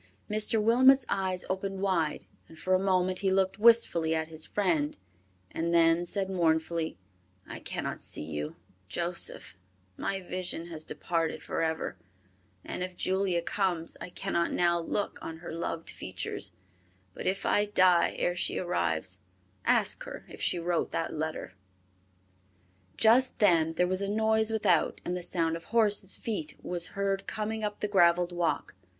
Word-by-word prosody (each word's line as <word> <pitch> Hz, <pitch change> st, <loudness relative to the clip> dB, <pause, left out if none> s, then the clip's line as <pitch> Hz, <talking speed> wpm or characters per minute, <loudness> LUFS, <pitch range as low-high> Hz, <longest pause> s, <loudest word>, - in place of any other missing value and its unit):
Mr. 215 Hz, +1 st, +1 dB
Wilmot's 255 Hz, +4 st, +5 dB
eyes 185 Hz, -2 st, -1 dB
opened 195 Hz, +1 st, -3 dB
wide 180 Hz, -6 st, 0 dB, 0.2 s
and 160 Hz, -, -14 dB
for 185 Hz, +3 st, 0 dB
a 185 Hz, -, +5 dB
moment 185 Hz, -1 st, +1 dB
he 195 Hz, -, +1 dB
looked 190 Hz, +1 st, +1 dB
wistfully 210 Hz, -8 st, +4 dB
at 160 Hz, 0 st, -2 dB
his 160 Hz, -1 st, -3 dB
friend, 165 Hz, -8 st, 0 dB, 0.5 s
and 170 Hz, +1 st, -1 dB
then 165 Hz, +1 st, +4 dB
said 195 Hz, 0 st, -1 dB
mournfully, 165 Hz, -, 0 dB, 0.5 s
"I -, -, -7 dB
cannot -, -, -4 dB
see -, -, -5 dB
you, 75 Hz, -1 st, -5 dB, 0.3 s
Joseph, 170 Hz, -, -3 dB, 0.4 s
my 195 Hz, -, -2 dB
vision 180 Hz, -2 st, -4 dB
has 155 Hz, -2 st, -4 dB
departed 165 Hz, -2 st, -2 dB
forever, 160 Hz, -1 st, -2 dB, 0.7 s
and -, -, -5 dB
if 180 Hz, -1 st, -4 dB
Julia 190 Hz, -2 st, +1 dB
comes, 175 Hz, -4 st, -1 dB
I -, -, -6 dB
cannot 175 Hz, -1 st, -1 dB
now 170 Hz, -1 st, +2 dB
look 200 Hz, +4 st, -2 dB
on 160 Hz, -, -6 dB
her 170 Hz, 0 st, -8 dB
loved 165 Hz, 0 st, -4 dB
features, 95 Hz, -1 st, -4 dB, 0.6 s
but -, -, -5 dB
if 190 Hz, +1 st, -1 dB
I 205 Hz, -, +3 dB
die 185 Hz, -4 st, +4 dB
ere 175 Hz, -, 0 dB
she -, -, -1 dB
arrives, 90 Hz, -, -1 dB, 0.5 s
ask -, -, +3 dB
her -, -, -8 dB
if -, -, -11 dB
she -, -, +1 dB
wrote 170 Hz, 0 st, 0 dB
that 165 Hz, -, -2 dB
letter." 155 Hz, -9 st, -4 dB, 1.4 s
Just 245 Hz, +4 st, +5 dB
then 165 Hz, -6 st, +4 dB
there 180 Hz, +2 st, +2 dB
was 185 Hz, +1 st, 0 dB
a 200 Hz, -, -1 dB
noise 220 Hz, +1 st, +2 dB
without, 215 Hz, -7 st, +2 dB
and 180 Hz, -, -1 dB
the 180 Hz, -, -3 dB
sound 165 Hz, -2 st, 0 dB
of 165 Hz, -, -8 dB
horses' 210 Hz, -4 st, +2 dB
feet 200 Hz, -10 st, -4 dB
was 175 Hz, -1 st, 0 dB
heard 195 Hz, 0 st, -1 dB
coming 220 Hz, +1 st, -3 dB
up 205 Hz, -1 st, -3 dB
the 210 Hz, -, 0 dB
graveled 175 Hz, -3 st, +4 dB
walk. 175 Hz, -2 st, -1 dB
180 Hz, 155 wpm, -29 LUFS, 165-195 Hz, 1.4 s, Wilmot's